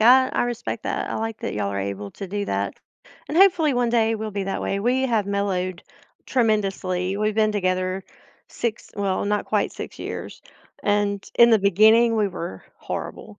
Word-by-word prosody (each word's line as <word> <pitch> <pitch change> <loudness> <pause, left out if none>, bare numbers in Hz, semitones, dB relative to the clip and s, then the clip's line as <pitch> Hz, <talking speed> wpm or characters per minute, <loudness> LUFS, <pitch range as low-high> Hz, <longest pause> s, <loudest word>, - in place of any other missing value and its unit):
I 260 +3 +7
I - - +1
respect 240 -1 -3
that, - - -2
I - - -2
like 225 0 -3
that - - -4
y'all 100 -1 -1
are 100 - -3
able 100 +1 -4
to 195 - -7
do 205 +2 -3
that, - - -1 0.5
and 310 - -3
hopefully, 355 -6 +5
one 245 -1 +1
day, 225 -1 +2
we'll 215 0 -5
be 200 0 -2
that 195 - -3
way, 195 - -1
we 250 +4 +1
have 230 -6 +1
mellowed 190 -3 -1 0.4
tremendously, 195 -5 0
we've 215 0 0
been 215 -1 +3
together 185 -1 -1 0.5
six 230 -2 -4
well, 200 -2 0
not 205 0 0
quite - - 0
six - - -8
years, - - -6 0.4
and 205 -1 +1
in 235 0 +8
the 225 - +6
beginning, 220 +4 +5
we 210 - +2
were 170 - -6
horrible, - - -6
205 Hz, 185 wpm, -23 LUFS, 190-230 Hz, 0.5 s, in